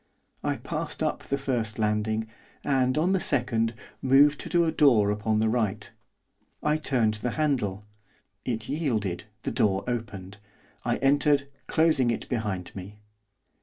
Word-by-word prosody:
I -, -, 0 dB
passed -, -, -4 dB
up -, -, -1 dB
the 140 Hz, -, -2 dB
first 120 Hz, -6 st, -2 dB
landing, 110 Hz, 0 st, 0 dB, 0.4 s
and, 130 Hz, -1 st, +2 dB
on 170 Hz, +5 st, +2 dB
the 190 Hz, -, +2 dB
second, 115 Hz, -6 st, 0 dB, 0.3 s
moved 140 Hz, +3 st, +5 dB
to 170 Hz, -1 st, +4 dB
a 160 Hz, -, +1 dB
door 120 Hz, -10 st, +4 dB
upon 105 Hz, +1 st, 0 dB
the 110 Hz, +1 st, +2 dB
right. 110 Hz, -2 st, -1 dB, 0.7 s
I 150 Hz, 0 st, +2 dB
turned 125 Hz, -8 st, +2 dB
the 125 Hz, -, -1 dB
handle, 120 Hz, -10 st, 0 dB, 0.6 s
it 115 Hz, -3 st, -3 dB
yielded, 110 Hz, -, -1 dB, 0.2 s
the -, -, -2 dB
door 95 Hz, -2 st, +1 dB
opened, 100 Hz, -5 st, -5 dB, 0.4 s
I -, -, 0 dB
entered, 145 Hz, 0 st, +3 dB, 0.2 s
closing 155 Hz, -6 st, +3 dB
it 115 Hz, -, -2 dB
behind 100 Hz, -7 st, -3 dB
me. 100 Hz, +2 st, -8 dB
115 Hz, 140 wpm, -27 LUFS, 105-140 Hz, 0.7 s, moved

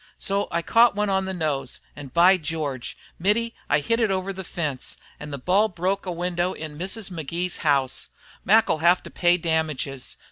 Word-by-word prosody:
So 200 Hz, 0 st, 0 dB
I 170 Hz, -1 st, -1 dB
caught 230 Hz, +4 st, +5 dB
one 205 Hz, -1 st, +1 dB
on 190 Hz, 0 st, +1 dB
the 190 Hz, -, -2 dB
nose, 145 Hz, -7 st, -2 dB, 0.2 s
and, 145 Hz, -3 st, -9 dB
by 180 Hz, +5 st, +6 dB
George! 150 Hz, -6 st, -4 dB, 0.2 s
Mittie, 225 Hz, +6 st, +1 dB, 0.2 s
I 145 Hz, -, +3 dB
hit 230 Hz, +10 st, +1 dB
it 225 Hz, -3 st, +2 dB
over 190 Hz, 0 st, -1 dB
the 190 Hz, 0 st, -6 dB
fence, 150 Hz, -7 st, -3 dB, 0.2 s
and 150 Hz, 0 st, -7 dB
the 140 Hz, -, -3 dB
ball 185 Hz, +10 st, +3 dB
broke 190 Hz, +1 st, -2 dB
a -, -, -1 dB
window 175 Hz, +1 st, -1 dB
in 155 Hz, -1 st, -7 dB
Mrs. 195 Hz, +5 st, -3 dB
Magee's 170 Hz, +2 st, -3 dB
house. 140 Hz, -4 st, +1 dB, 0.3 s
Mac 220 Hz, +4 st, +5 dB
'll -, -, +1 dB
have 175 Hz, +3 st, +4 dB
to -, -, -10 dB
pay 175 Hz, 0 st, +3 dB
damages. 155 Hz, -6 st, -2 dB
175 Hz, 190 wpm, -24 LUFS, 150-195 Hz, 0.3 s, by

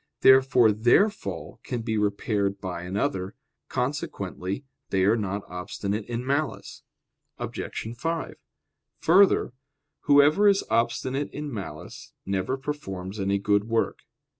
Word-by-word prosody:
Therefore 130 Hz, -3 st, +6 dB
their 120 Hz, -, +4 dB
fall -, -, -7 dB
can 120 Hz, -3 st, -4 dB
be 110 Hz, -1 st, -1 dB
repaired 100 Hz, -1 st, 0 dB
by 90 Hz, -3 st, -5 dB
another. 95 Hz, +1 st, -2 dB, 0.3 s
Consequently 125 Hz, -5 st, -3 dB, 0.2 s
they 95 Hz, -1 st, +1 dB
are 105 Hz, +3 st, +4 dB
not 100 Hz, -2 st, -2 dB
obstinate 100 Hz, +3 st, -4 dB
in 120 Hz, +1 st, -3 dB
malice. 140 Hz, +2 st, -2 dB, 0.6 s
Obj. -, -, -5 dB
5: 165 Hz, +6 st, -3 dB, 0.6 s
Further, 185 Hz, -6 st, +4 dB, 0.5 s
whoever 145 Hz, +7 st, +5 dB
is 200 Hz, -1 st, +4 dB
obstinate 130 Hz, +4 st, 0 dB
in 145 Hz, -1 st, -5 dB
malice, 95 Hz, -8 st, -8 dB
never 95 Hz, +7 st, -1 dB
performs 105 Hz, -9 st, -5 dB
any 100 Hz, 0 st, +1 dB
good 100 Hz, +1 st, +1 dB
work. 115 Hz, 0 st, 0 dB
110 Hz, 115 wpm, -26 LUFS, 100-135 Hz, 0.6 s, Therefore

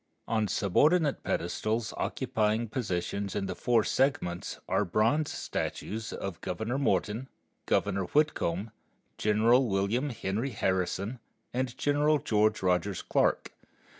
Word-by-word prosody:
On 110 Hz, -2 st, +1 dB
subordinate 145 Hz, -, +2 dB
pedestals 110 Hz, +6 st, -1 dB
occupying 110 Hz, +1 st, 0 dB
positions 100 Hz, -3 st, -2 dB
in 100 Hz, -1 st, -1 dB
the 95 Hz, -, -3 dB
four 120 Hz, -3 st, +2 dB
segments 130 Hz, -12 st, 0 dB
are -, -, +2 dB
bronze 115 Hz, -, +1 dB
statues 110 Hz, +2 st, -4 dB
of 95 Hz, -4 st, -5 dB
Governor 110 Hz, +8 st, -2 dB
Morton, 120 Hz, -3 st, 0 dB, 0.4 s
Governor 95 Hz, 0 st, +1 dB
Whitcomb, 110 Hz, -, 0 dB, 0.5 s
General 115 Hz, +5 st, +4 dB
William 105 Hz, +8 st, 0 dB
Henry 110 Hz, +1 st, -2 dB
Harrison, 95 Hz, +4 st, -1 dB, 0.3 s
and 125 Hz, 0 st, -2 dB
General 145 Hz, +1 st, +3 dB
George 110 Hz, -5 st, +1 dB
Rogers 90 Hz, +1 st, +1 dB
Clark. -, -, +1 dB
110 Hz, 110 wpm, -29 LUFS, 95-130 Hz, 0.5 s, General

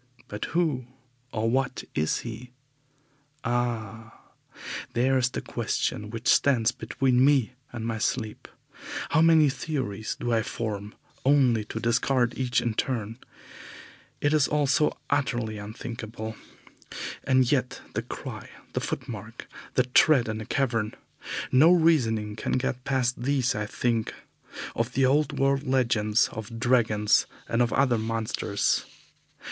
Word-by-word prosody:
But 105 Hz, 0 st, -4 dB
who 150 Hz, -8 st, 0 dB, 0.4 s
and 115 Hz, +2 st, 0 dB
what 135 Hz, -1 st, 0 dB
is 75 Hz, +1 st, 0 dB
he? 120 Hz, +1 st, -7 dB, 0.9 s
Ah! 115 Hz, -2 st, -2 dB, 0.8 s
there 130 Hz, +3 st, +2 dB
is 125 Hz, -1 st, +2 dB
the -, -, -5 dB
question 105 Hz, 0 st, -2 dB
which 115 Hz, +1 st, -5 dB
stands 125 Hz, -5 st, +4 dB
between 130 Hz, -1 st, +1 dB
me 135 Hz, -4 st, +3 dB, 0.2 s
and 115 Hz, -2 st, -5 dB
my 115 Hz, -1 st, -2 dB
sleep. 110 Hz, -2 st, -2 dB, 0.6 s
How 155 Hz, -, +3 dB
many 160 Hz, -2 st, +6 dB
theories 130 Hz, -7 st, -3 dB
do 120 Hz, -, -1 dB
I 115 Hz, -, +3 dB
form, 105 Hz, -2 st, -4 dB, 0.3 s
only 130 Hz, -5 st, +4 dB
to 110 Hz, -, -5 dB
discard 120 Hz, +1 st, +1 dB
each 125 Hz, -1 st, +1 dB
in 120 Hz, -, -1 dB
turn! 115 Hz, -1 st, -2 dB, 1.0 s
It 145 Hz, +1 st, +2 dB
is 150 Hz, -2 st, +4 dB
all 150 Hz, -1 st, +1 dB
so 150 Hz, +2 st, +2 dB
utterly 120 Hz, -7 st, 0 dB
unthinkable. 110 Hz, +1 st, -6 dB, 0.9 s
And 130 Hz, -2 st, +3 dB
yet 125 Hz, -3 st, 0 dB
the -, -, -1 dB
cry, -, -, -7 dB, 0.2 s
the -, -, -1 dB
footmark, -, -, -6 dB, 0.3 s
the -, -, +4 dB
tread 130 Hz, 0 st, +4 dB
in 110 Hz, 0 st, -3 dB
the 110 Hz, -, -7 dB
cavern 115 Hz, -6 st, 0 dB, 0.6 s
no 150 Hz, +7 st, +7 dB
reasoning 120 Hz, -12 st, +3 dB
can -, -, -3 dB
get 130 Hz, 0 st, -1 dB
past 125 Hz, -3 st, 0 dB
these 130 Hz, -1 st, +1 dB
I 105 Hz, 0 st, -3 dB
think 115 Hz, 0 st, -1 dB, 0.6 s
of 115 Hz, +2 st, -1 dB
the 135 Hz, +1 st, +3 dB
old 145 Hz, +2 st, +2 dB
world 135 Hz, 0 st, +2 dB
legends 115 Hz, -4 st, +2 dB
of 110 Hz, +1 st, -7 dB
dragons 115 Hz, -4 st, +3 dB, 0.2 s
and 115 Hz, -, +1 dB
of 120 Hz, -2 st, +2 dB
other 130 Hz, -3 st, +2 dB
monsters. 110 Hz, -2 st, -1 dB
120 Hz, 135 wpm, -27 LUFS, 110-135 Hz, 1.0 s, no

